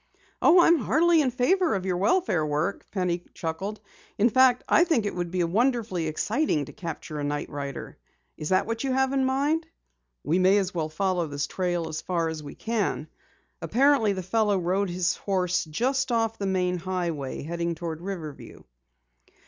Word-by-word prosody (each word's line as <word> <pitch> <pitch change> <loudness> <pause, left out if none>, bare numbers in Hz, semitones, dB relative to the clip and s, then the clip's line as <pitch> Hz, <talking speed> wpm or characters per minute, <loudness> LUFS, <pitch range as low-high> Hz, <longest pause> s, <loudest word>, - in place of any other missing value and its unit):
"Oh, 355 +2 +7
I'm 335 -1 +5
heartily 320 +7 +3
in 270 - +2
favor 320 - +2
of 190 -1 -3
your 180 -2 0
welfare 200 - +2
work," 155 +6 -2
Penny 180 -3 -1
chuckled. 190 +6 -4 0.4
"In 220 +3 +3
fact, 255 +1 +4
I 340 - +5
think 315 -11 +1
it 205 - -2
would 175 -1 -3
be 180 0 0
wonderfully 215 -2 0
exciting 180 - 0
to - - -12
capture 165 -3 -6
a - - -3
night 145 0 -3
rider. 140 -3 -6 0.4
Is 155 -1 -5
that 185 0 +3
what 230 +2 -3
you 265 -1 0
have 265 0 +1
in 270 -1 +2
mind?" 290 +5 0 0.6
"We 170 +4 +1
may 190 +2 +5
as 195 -1 -1
well 160 -3 -2
follow 180 +1 0
this 145 0 -2
trail 175 -3 -2
as 155 - -4
far 170 -3 -1
as 160 -1 -5
we 145 -1 -9
can. 210 -9 -2 0.5
Apparently, 235 - +3
the 185 -1 -4
fellow 210 +2 +1
rode 185 +2 0
his 175 0 0
horse 180 -3 0
just 260 - -1
off 225 -1 0
the 200 - -1
main 180 -1 0
highway, 170 -8 -3
heading 170 +2 -2
toward 165 -1 -5
Riverview." 170 -6 -7
185 Hz, 180 wpm, -26 LUFS, 165-235 Hz, 0.6 s, Oh